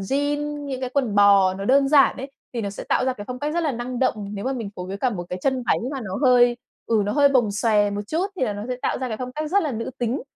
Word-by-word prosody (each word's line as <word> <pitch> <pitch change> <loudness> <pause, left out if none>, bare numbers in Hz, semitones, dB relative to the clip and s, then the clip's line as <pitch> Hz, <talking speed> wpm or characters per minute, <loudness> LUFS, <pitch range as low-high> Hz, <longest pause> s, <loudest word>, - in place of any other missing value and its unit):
jean, 290 +6 -2
những 265 -2 -4
cái 255 -1 -3
quần 255 -6 0
bò 200 -2 +5
nó 195 +1 -5
đơn 275 +4 +4
giản 275 -4 +5
ấy, 270 +2 -7 0.2
thì 235 - -1
nó 200 -2 -3
sẽ 200 - -8
tạo - - +2
ra 260 - +1
cái 205 -5 -9
phong 250 - -5
cách 295 +3 -3
rất 345 - +1
là 305 -4 0
năng 245 +1 -4
động. 255 - +2 0.2
Nếu 200 - -5
mà 265 - 0
mình 230 -6 -5
phối 180 - -6
với 190 +1 -5
cả 250 +5 0
một 180 -6 -5
cái 180 - -3
chân 265 -2 0
váy - - +3 0.2
mà 275 - -4
nó 190 -5 -5
hơi 245 -2 +5 0.3
ừ, 225 -2 +2
nó 205 - -1
hơi 285 -1 +5
bồng 245 -6 +2
xòe 210 -1 +2
một 200 0 -3
chút 330 - -1
thì - - -3
là 215 - -1
nó 205 0 -6
sẽ 250 - -2
tạo - - 0
ra 260 - -3
cái 220 - -3
phong 250 +2 -6
cách 305 +2 -4
rất 400 +3 +3
là 300 -4 -2
nữ 230 +1 -4
tính. 240 +2 -1
250 Hz, 315 wpm, -23 LUFS, 205-275 Hz, 0.3 s, bò